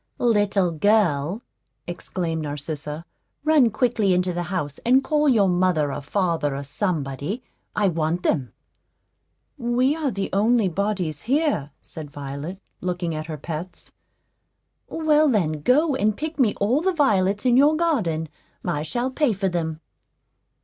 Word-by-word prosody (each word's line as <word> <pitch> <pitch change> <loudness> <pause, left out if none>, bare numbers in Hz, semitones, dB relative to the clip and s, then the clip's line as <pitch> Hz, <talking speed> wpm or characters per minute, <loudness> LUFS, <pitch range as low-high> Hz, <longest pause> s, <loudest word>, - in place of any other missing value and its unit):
"Little 205 -6 +2
girl," 180 0 +1 0.4
exclaimed 175 -2 -3
Narcissa, 150 +1 -5 0.4
"run 305 -6 +5
quickly 220 -4 +1
into 180 0 +1
the 175 - -2
house 165 -5 -3
and 255 +3 +3
call 300 0 +2
your 215 -6 +4
mother 175 -5 +1
or 145 - -4
father, 165 -3 0
or 140 - -4
somebody; 145 - -3 0.3
I 210 -1 +2
want 165 0 -1
them." 130 -6 0 1.1
"We 250 +4 +2
are 310 -3 -1
the 195 -4 -3
only 215 +1 +3
bodies 180 -5 -2
here," 275 - 0
said 155 -2 -7
Violet, 145 +6 -6 0.2
looking 175 -2 -2
at 155 0 -5
her 155 -2 -5
pets. 165 +4 -7 1.0
"Well, 310 -1 +3
then, 160 - 0
go 290 - +3
and 215 -5 +1
pick 315 0 -5
me 230 -6 +3
all 235 +9 +1
the 380 +2 +1
violets 205 - +2
in 245 -1 +4
your 290 +4 +5
garden; 205 - 0 0.4
I 150 - -1
shall 240 +11 -2
pay 265 -3 +1
for 195 -1 -1
them." 160 -2 -3
190 Hz, 140 wpm, -23 LUFS, 155-245 Hz, 1.1 s, run